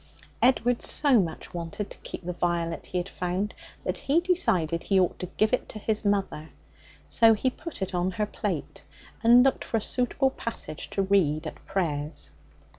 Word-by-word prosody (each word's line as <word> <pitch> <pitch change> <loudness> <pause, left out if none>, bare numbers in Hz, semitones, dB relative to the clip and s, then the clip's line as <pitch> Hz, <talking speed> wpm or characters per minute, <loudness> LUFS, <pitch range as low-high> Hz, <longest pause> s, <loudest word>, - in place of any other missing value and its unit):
Edward 245 -1 +3
so 280 -6 +4
much 165 -5 -3
wanted 170 +4 -5
to - - -10
keep - - -8
the 180 - -2
violet 170 -2 -1
he 180 - -3
had 175 +1 -1
found 185 +2 -2 0.3
that - - -2
he 290 +4 +2
decided 185 - +1
he 195 -2 +2
ought 180 - +1
to 180 - -4
give 215 +3 +2
it 255 - 0
to - - -7
his 215 +1 -1
mother. 195 -6 -1 0.6
So 225 -1 +5
he 255 +5 0
put 315 - -6
it 190 - -5
on 180 +1 +1
her 210 +1 0
plate, - - -4 0.4
and 240 +2 +8
looked 270 - +2
for 225 - -1
a - - -1
suitable 265 +4 +1
passage 230 - -5
to 195 - 0
read 170 -6 +2
at 155 - -8
prayers. 150 -6 -2
195 Hz, 185 wpm, -27 LUFS, 175-235 Hz, 0.6 s, and